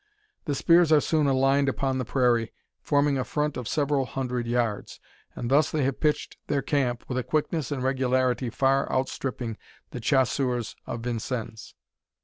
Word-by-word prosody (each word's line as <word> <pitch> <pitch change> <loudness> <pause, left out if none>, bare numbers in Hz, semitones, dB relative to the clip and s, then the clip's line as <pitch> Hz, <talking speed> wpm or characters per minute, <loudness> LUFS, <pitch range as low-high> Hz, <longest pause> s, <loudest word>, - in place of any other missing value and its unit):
The 145 -4 -1
spears 170 +2 +4
are 155 - +7
soon 150 0 +1
aligned 135 +1 +3
upon 135 0 -1
the 130 - -2
prairie, 120 -3 +1 0.3
forming 145 -2 +2
a - - 0
front 150 +2 -2
of 125 -3 -5
several 140 -3 0
hundred 125 -2 -3
yards; 115 -3 -2 0.4
and 120 - -4
thus 145 +3 +4
they 155 -3 0
have 135 0 -1
pitched 150 -1 0
their 140 -2 0
camp 125 -5 -1
with 125 -1 -2
a - - -2
quickness 155 0 -1
and 135 -3 -2
regularity 130 -1 +1
far 135 +3 +1
outstripping 130 -3 -3 0.3
the 125 - -5
Chasseurs 125 -1 0
of 120 - -4
Vincennes. 115 -1 -5
130 Hz, 160 wpm, -26 LUFS, 125-140 Hz, 0.4 s, are